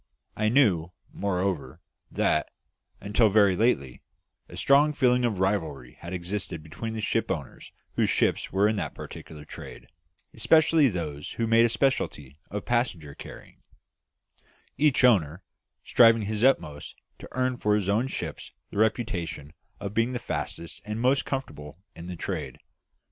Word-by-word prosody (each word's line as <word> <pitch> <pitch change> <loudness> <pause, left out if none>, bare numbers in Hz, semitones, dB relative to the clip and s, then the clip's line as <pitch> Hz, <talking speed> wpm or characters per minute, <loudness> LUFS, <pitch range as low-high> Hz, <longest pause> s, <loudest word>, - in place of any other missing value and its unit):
I 110 0 +1
knew, 95 - +3 0.2
moreover, 90 -7 -2 0.3
that, 75 - +1 0.5
until 105 +3 +2
very 100 -2 +4
lately, 70 - 0 0.5
a - - -10
strong 145 +2 +4
feeling 125 -3 +3
of 115 -5 0
rivalry 80 -10 -1
had 85 - -8
existed 90 -2 -4
between 110 +8 -6
the 110 - 0
owners - - -5 0.2
whose - - +1
ships - - +1
were 100 +2 +3
in 110 0 0
that - - -4
particular 75 -2 -10
trade - - -10 0.5
especially 155 +5 +4
those 80 - -4
who 115 - -1
made 115 +1 +5
a - - +2
speciality 95 - -1
of 105 -1 -5
passenger 115 - -1
carrying - - -12 1.1
each 145 -2 +3
owner 95 -8 +3 0.4
striving 115 -2 +5
his 105 +2 -2
utmost 75 - +1 0.2
to - - -10
earn 130 0 0
for 105 -2 +2
his 105 -3 -1
own 110 +6 +2
ships - - -5 0.2
the - - -7
reputation 95 - -1 0.3
of 100 0 -5
being 115 +3 +1
the - - -1
fastest 85 -7 -5
and 105 +1 -4
most 130 +3 +2
comfortable 75 - -5 0.2
in 85 +1 -9
the 90 - -5
trade. 80 -7 -4
105 Hz, 145 wpm, -27 LUFS, 85-120 Hz, 1.1 s, made